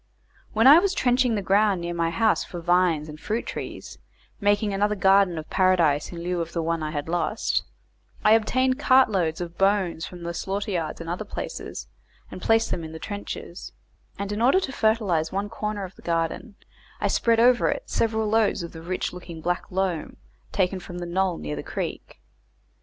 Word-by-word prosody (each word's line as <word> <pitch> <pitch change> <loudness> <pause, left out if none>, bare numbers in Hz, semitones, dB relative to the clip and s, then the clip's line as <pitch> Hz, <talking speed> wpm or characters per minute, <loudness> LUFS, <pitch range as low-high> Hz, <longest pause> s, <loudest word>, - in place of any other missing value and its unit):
When 225 +2 +3
I 290 +5 +10
was 385 +1 0
trenching 250 -2 +2
the 200 - -2
ground 200 0 +3
near 170 0 -3
my 170 -1 0
house 220 +6 +2
for 175 - -7
vines 175 -3 +2
and 155 0 -9
fruit 220 +7 -2
trees, - - -7 0.4
making 205 0 +2
another 205 +2 +1
garden 195 -2 +4
of 155 - -6
paradise 170 -6 +2
in 170 -1 -7
lieu 175 0 -1
of 165 0 -5
the 170 - -1
one 165 0 -1
I 155 - -2
had 150 -1 -4
lost, 175 +5 0 0.6
I 215 - +5
obtained 255 +4 +3
cart 260 -3 +5
loads 170 -4 0
of 170 -1 -7
bones 195 -4 +1
from 175 -1 -10
the 170 0 -4
slaughter 200 +4 -3
yards 165 -3 -3
and 165 - -7
other 175 +5 -3
places, 215 - -6 0.5
and - - -8
placed 225 0 +2
them 170 - -2
in 160 0 -7
trenches; 205 -1 -7 0.4
and 200 0 -4
in 210 +2 -2
order 265 +10 +5
to 270 - -3
fertilize 210 - +1
one 200 +2 -2
corner 210 -2 -4
of 185 0 -7
the - - -16
garden, 170 +6 -2 0.4
I - - +1
spread 230 -1 +2
over 245 +1 +5
it - - -2
several 220 -1 0
loads 215 -3 +2
of 170 - -7
the 165 - -10
rich 180 +2 -3
looking 175 -2 -9
black 175 +2 -2
loam 185 -3 -2 0.3
taken 185 -1 0
from 175 0 -9
the 175 - -4
knoll 185 0 0
near 75 0 -5
the 75 - -4
creek. - - -6
190 Hz, 195 wpm, -25 LUFS, 170-215 Hz, 0.6 s, I